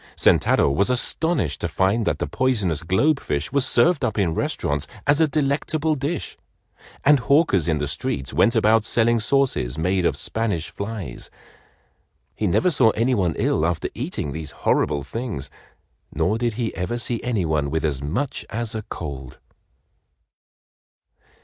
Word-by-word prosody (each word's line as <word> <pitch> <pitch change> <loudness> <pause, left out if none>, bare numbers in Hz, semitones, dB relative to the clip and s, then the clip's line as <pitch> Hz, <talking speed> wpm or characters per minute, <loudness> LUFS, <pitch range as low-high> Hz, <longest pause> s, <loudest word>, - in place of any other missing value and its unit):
Sentaro - - +4
was 100 - +1
astonished 125 - 0
to - - 0
find 100 +4 +1
that - - +1
the - - -2
poisonous 105 - 0
globe 135 - +2
fish 70 0 -3
was 140 -2 +3
served 140 +6 +3
up 110 -4 -1
in 90 -6 +1
restaurants 75 -2 -2 0.2
as 145 +2 +4
a 160 - +5
delectable 150 +2 0
dish, 145 +2 -3 0.7
and 145 0 +6
hawkers 140 - +3
in 80 -2 +1
the 75 - -1
streets 70 -1 -3
went 115 - +3
about 110 0 +4
selling 115 +1 +2
sauces 110 - +1
made 90 +3 0
of - - +1
Spanish 105 -8 -2
flies. 100 - -6 1.0
He 105 - -1
never 175 - +2
saw 130 -7 +4
any 120 +4 +1
one 90 -7 0
ill 80 - +1
after 80 0 -1
eating 70 - -4
these 80 0 -5 0.2
horrible 70 - +2
things, 110 - -5 0.6
nor 110 +5 0
did 120 -1 0
he 115 -1 -3
ever 95 +7 -2
see 120 -1 -2
any 115 -7 -1
one 75 -3 0
with 80 +2 -1
as 70 -3 -1
much 110 - -2
as 115 +1 -1
a 110 - -3
cold. 70 - -7
110 Hz, 155 wpm, -22 LUFS, 80-130 Hz, 1.0 s, and